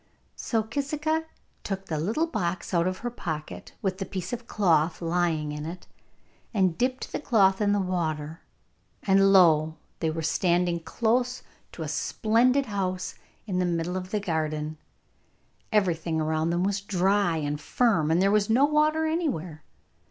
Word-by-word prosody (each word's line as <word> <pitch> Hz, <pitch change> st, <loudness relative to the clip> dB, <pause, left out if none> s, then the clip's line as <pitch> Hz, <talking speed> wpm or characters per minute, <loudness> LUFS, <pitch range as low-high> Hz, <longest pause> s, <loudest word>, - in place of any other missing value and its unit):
So 225 Hz, -2 st, -1 dB
Kisika 300 Hz, +6 st, -1 dB, 0.4 s
took 195 Hz, -1 st, -4 dB
the 155 Hz, -2 st, -3 dB
little 220 Hz, -, 0 dB
box 185 Hz, -, -3 dB
out 170 Hz, 0 st, +3 dB
of 185 Hz, 0 st, -2 dB
her 240 Hz, -, -1 dB
pocket, 160 Hz, -9 st, -6 dB
with 190 Hz, -1 st, -1 dB
the 195 Hz, -, -2 dB
piece 190 Hz, +4 st, -5 dB
of 235 Hz, -1 st, -5 dB
cloth 165 Hz, -5 st, +2 dB
lying 165 Hz, -3 st, 0 dB
in 150 Hz, 0 st, -5 dB
it, 170 Hz, +3 st, -7 dB, 0.7 s
and 185 Hz, -4 st, +2 dB
dipped 255 Hz, +4 st, -1 dB
the -, -, -2 dB
cloth 200 Hz, -8 st, +3 dB
in 205 Hz, -1 st, +3 dB
the 205 Hz, -, +2 dB
water, 165 Hz, -4 st, -2 dB, 0.6 s
and 195 Hz, 0 st, +4 dB
lo! 160 Hz, -4 st, +5 dB, 0.2 s
they 160 Hz, -, 0 dB
were 160 Hz, +1 st, -3 dB
standing 175 Hz, +1 st, +1 dB
close 240 Hz, +7 st, 0 dB, 0.3 s
to -, -, -5 dB
a -, -, -4 dB
splendid 250 Hz, +5 st, +2 dB
house 185 Hz, -4 st, -3 dB, 0.3 s
in 185 Hz, -4 st, -2 dB
the 180 Hz, -, +2 dB
middle 170 Hz, +1 st, -1 dB
of 185 Hz, 0 st, -4 dB
the 210 Hz, -, -1 dB
garden. 155 Hz, -4 st, -2 dB, 0.9 s
Everything 170 Hz, -6 st, +1 dB
round 160 Hz, +1 st, 0 dB
them 175 Hz, +1 st, 0 dB
was 200 Hz, +1 st, 0 dB
dry 195 Hz, -2 st, +1 dB
and 145 Hz, -1 st, -3 dB
firm, 200 Hz, -10 st, +2 dB
and 165 Hz, +2 st, +3 dB
there 195 Hz, +1 st, +3 dB
was 210 Hz, 0 st, +2 dB
no 250 Hz, +5 st, +5 dB
water 305 Hz, +1 st, +2 dB
anywhere. 220 Hz, -, -2 dB
185 Hz, 160 wpm, -27 LUFS, 165-220 Hz, 0.9 s, lo